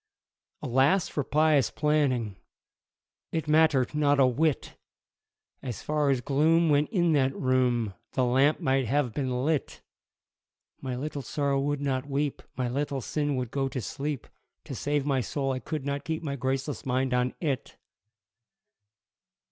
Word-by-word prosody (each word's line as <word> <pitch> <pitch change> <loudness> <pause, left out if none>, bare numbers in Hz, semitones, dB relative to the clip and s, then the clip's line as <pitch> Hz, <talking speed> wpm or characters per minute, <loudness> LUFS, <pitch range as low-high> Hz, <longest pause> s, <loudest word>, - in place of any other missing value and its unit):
Alas 135 +9 +3
for 145 - -2
pious 150 -2 +3
planning 140 -9 0 1.0
It 160 -2 -2
mattered 155 -4 +3
not 145 -1 +2
a 135 - +7
whit! 145 +4 0 0.9
As 125 -5 -6
far 150 -1 +1
as 130 -3 +2
gloom 160 +5 +3
went 145 0 +3
in 175 -6 +2
that 135 -2 +2
room, 125 -5 +1 0.2
The 130 - +2
lamp 135 +5 +3
might 135 -2 +1
have 130 -1 0
been 130 -1 -1
lit! 155 -3 -1 1.0
My 130 -2 -3
Little 145 +2 -4
Sorrow 140 +2 -1
would 145 0 -1
not 135 0 -2
weep, 140 0 -1 0.2
My 130 -1 0
Little 140 +2 -2
Sin 145 +2 -1
would 125 -2 -3
go 135 -1 -1
to 130 - -4
sleep 140 +3 -4 0.4
To - - -7
save 145 -1 -1
my 135 -3 +1
soul 135 +2 -2
I 130 - -2
could 150 +2 -5
not 140 0 -2
keep 160 +1 -3
My 140 -3 -3
graceless 135 +2 -2
mind 130 0 0
on 125 0 0
it! 140 -6 -3
140 Hz, 150 wpm, -28 LUFS, 130-150 Hz, 1.0 s, a